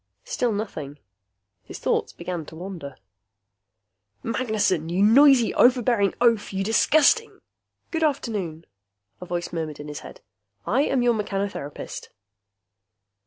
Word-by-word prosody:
Still 245 -2 -1
nothing. 160 -9 -5 0.6
His - - -10
thoughts - - -1
began 175 -1 -5
to 160 - -11
wander. 165 -6 -8 1.3
Magnessen! 215 -8 0
You 180 +3 +1
noisy, 255 +2 +6
overbearing 240 -5 +3
oaf, 230 -3 +2
you 195 0 -2
disgusting 310 - +3 0.5
"Good 325 - -2
afternoon," 205 - -2 0.6
a 180 - -8
voice 175 0 -4
murmured 160 -3 -4
in 150 0 -8
his 150 - -6
head. - - -12 0.4
"I 250 +6 +2
am 260 -2 +1
your 240 -1 +4
mechanotherapist." 200 -8 -4
205 Hz, 120 wpm, -24 LUFS, 170-245 Hz, 1.3 s, noisy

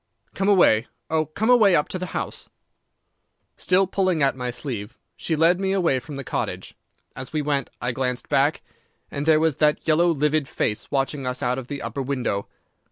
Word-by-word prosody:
Come 195 +1 0
away—oh, 155 - +2
come 220 +10 0
away 215 -7 +6
up 150 - +2
to 185 - -4
the 185 - -4
house.' - - -5 1.1
"Still 185 +1 +2
pulling 185 -4 0
at 135 - +2
my 125 -1 -4
sleeve, 120 -4 -5 0.2
she 160 - -2
led 165 +3 +3
me 195 0 0
away 170 -9 +2
from 145 +3 -9
the 140 - -5
cottage. - - -4 0.4
As 130 -1 -7
we 155 -1 -1
went 140 -3 -1
I 125 - -1
glanced 125 0 -2
back, - - +1 0.5
and 140 +2 -4
there 155 -1 +5
was 160 -3 +1
that 150 +1 +1
yellow 165 +2 +4
livid 150 -2 +1
face 105 -4 -2
watching 135 0 -1
us 125 +2 -3
out 125 +1 0
of 125 - -9
the 145 0 -5
upper 140 - -4
window. 125 -7 -2
150 Hz, 185 wpm, -23 LUFS, 130-170 Hz, 1.1 s, away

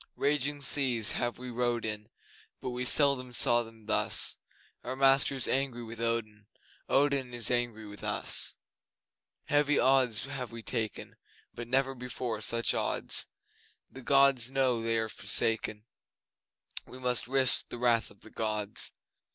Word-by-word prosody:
Raging 145 0 0
seas 125 -7 +1
have 120 -1 -2
we 125 0 -8
rowed 120 -1 -1
in, 105 -1 -4 0.5
But 130 - -5
we 125 +1 -4
seldom 130 -2 +3
saw 120 0 +5
them 115 -1 -13
thus; 110 - +2 0.5
Our 130 +2 -4
master 135 +1 +3
is 130 - +1
angry 130 -3 -1
with 115 0 -9
Odin 110 -3 -3 0.4
Odin 135 -3 +1
is 120 0 0
angry 120 -3 0
with 105 0 -11
us! - - -1 0.9
Heavy 145 0 +2
odds 130 -4 +3
have 135 -3 -6
we 115 -1 -9
taken, 110 -3 -4 0.4
But 120 0 -7
never 135 +2 +1
before 125 -3 -5
such 115 +1 0
odds. - - 0 0.6
The 135 - -11
Gods 135 -2 +4
know 130 -3 +1
they 115 0 0
are 110 0 -1
forsaken, 110 -1 +1 1.0
We 130 - -11
must 125 -3 +1
risk 130 -1 +1
the - - -6
wrath 120 -2 +2
of - - -20
the 110 - -13
Gods! 105 -2 -1
120 Hz, 145 wpm, -30 LUFS, 115-135 Hz, 1.0 s, saw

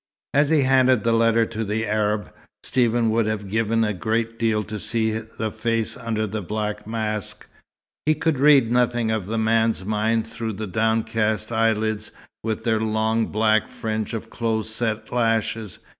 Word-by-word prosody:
As 145 +1 +3
he 160 -2 +4
handed 130 -3 +4
the 115 - +2
letter 115 0 +3
to 110 0 -4
the 110 +2 -1
Arab, 105 0 -1 0.3
Stephen 120 -2 +2
would 115 -1 +1
have 105 -2 -2
given 115 +2 +1
a 105 -1 0
great 115 +4 -2
deal 110 -2 +1
to 105 0 -6
see 110 0 0
the 110 0 -4
face 115 0 -1
under 110 -2 -2
the 110 +1 -4
black 105 +2 -4
mask. 110 -2 -3 0.6
He 155 - +4
could 155 -2 0
read 140 -5 +5
nothing 120 -2 +2
of 110 -4 -2
the 115 +2 -2
man's 110 -2 +1
mind 110 +2 +1
through 115 -1 -4
the 110 +2 -5
downcast 110 +1 0
eyelids, 110 -1 0 0.3
with 110 0 -2
their 110 -2 +1
long 110 +1 +1
black 110 0 +2
fringe 110 0 -3
of 115 0 -7
close 110 -2 -1
set 110 -1 -2
lashes. 115 -3 0
110 Hz, 165 wpm, -23 LUFS, 110-115 Hz, 0.6 s, read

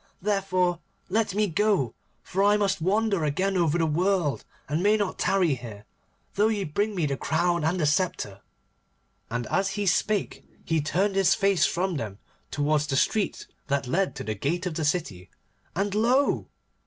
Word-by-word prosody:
Therefore, 185 -3 0 0.3
let 205 0 0
me 210 +1 +3
go, 190 - +1 0.3
for 195 +2 -1
I 205 +1 +5
must 195 -4 0
wander 200 0 +1
again 185 +7 0
over 170 -3 +2
the 165 - +2
world, 170 -1 +1 0.2
and 155 +3 -1
may 210 +3 +4
not 205 -3 -2
tarry 185 -6 +2
here, 110 -5 -8 0.5
though 210 +2 +3
ye 215 -3 0
bring 205 +6 -1
me 170 -4 0
the 140 -1 -1
crown 170 +3 0
and 170 +4 +1
the 155 - +2
sceptre.' 150 - -1 0.9
And 120 +2 -3
as 195 0 +1
he 205 - -1
spake 200 +2 0 0.2
he 165 -2 +1
turned 190 +7 0
his 195 -1 +3
face 195 -7 +3
from 180 -1 -1
them 105 -6 -5 0.3
towards 150 +1 0
the 135 - -1
street 210 +7 0 0.2
that 140 -1 0
led 180 +9 0
to - - -5
the 110 - -2
gate 165 - -2
of 180 - -2
the 155 -1 -2
city, 105 - -2 0.5
and 195 +2 -1
lo! 245 +6 +2
180 Hz, 175 wpm, -26 LUFS, 150-200 Hz, 0.9 s, I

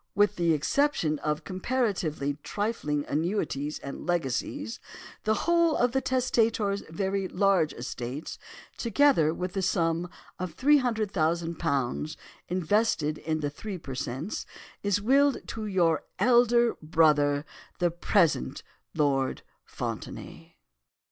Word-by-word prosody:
With 205 0 +3
the 170 -2 +3
exception 155 - +1
of 150 0 -2
comparatively 185 - -1
trifling 205 -10 -2
annuities 150 -3 -1
and 140 - -8
legacies, 175 - -2 0.5
the 215 0 +3
whole 335 -2 +4
of 245 0 +2
the 265 +1 +1
testator's 230 -6 +1
very 190 +3 -1
large 185 -5 +2
estates, 125 +3 -6 0.4
together 235 - +4
with 180 +2 -4
the 195 - -1
sum 170 -2 0 0.3
of 180 -3 -5
£300,000 170 - +1 0.3
invested 180 -3 +1
in 155 -1 -2
the 145 -1 -1
three 195 +6 -6
per 140 -5 -8
cents, 135 - -4 0.3
is 205 -1 +1
willed 275 +6 +3
to 220 -1 -4
your 175 -5 +2 0.2
elder 240 -1 +4
brother, 150 -2 +3 0.3
the 175 -1 +1
present 170 - +1 0.3
Lord 140 -4 +1 0.2
Fontenaye. - - -7
180 Hz, 110 wpm, -28 LUFS, 150-220 Hz, 0.5 s, whole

